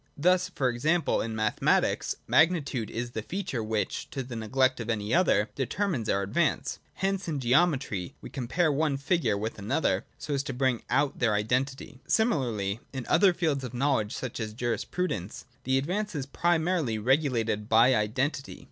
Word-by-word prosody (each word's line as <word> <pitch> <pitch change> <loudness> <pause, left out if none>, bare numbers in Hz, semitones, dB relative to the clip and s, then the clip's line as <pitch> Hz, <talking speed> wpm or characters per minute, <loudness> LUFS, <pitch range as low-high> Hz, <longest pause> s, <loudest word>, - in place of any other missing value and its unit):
Thus, 180 +4 +3
for 140 -7 -1
example, 155 +8 +1
in 110 0 -3
mathematics 110 -1 +1
magnitude 155 - +2
is 120 +1 -4
the 110 - -3
feature 135 - -3
which, 110 -2 -2
to 135 - -4
the 125 -1 -8
neglect 130 +4 +1
of 115 -1 -5
any 105 0 -1
other, 110 - +3
determines 140 - -1
our 100 - +1
advance. 160 - 0 0.2
Hence 195 -1 -1
in 150 -4 -2
geometry 130 - +1
we - - -10
compare 150 +6 0
one 145 -1 +1
figure 135 - +1
with 110 +1 -4
another, 110 +11 0
so 150 - -4
as 140 - +1
to 135 - -3
bring 130 -2 +1
out 135 +3 +1
their 115 -4 +2
identity. 130 +5 -1
Similarly 120 - +1
in 130 -3 -5
other 190 +3 +5
fields 160 -6 -1
of 125 -1 -6
knowledge, 120 -5 +1
such 130 -2 -5
as 110 -1 -4
jiarisprudence, 115 - -3 0.2
the 130 +1 +2
advance 185 +8 -2
is 140 -3 -2
primarily 165 -5 +1
regulated 115 -4 +1
by 115 +3 +6
identity. 130 +6 -1
130 Hz, 165 wpm, -28 LUFS, 110-160 Hz, 0.2 s, by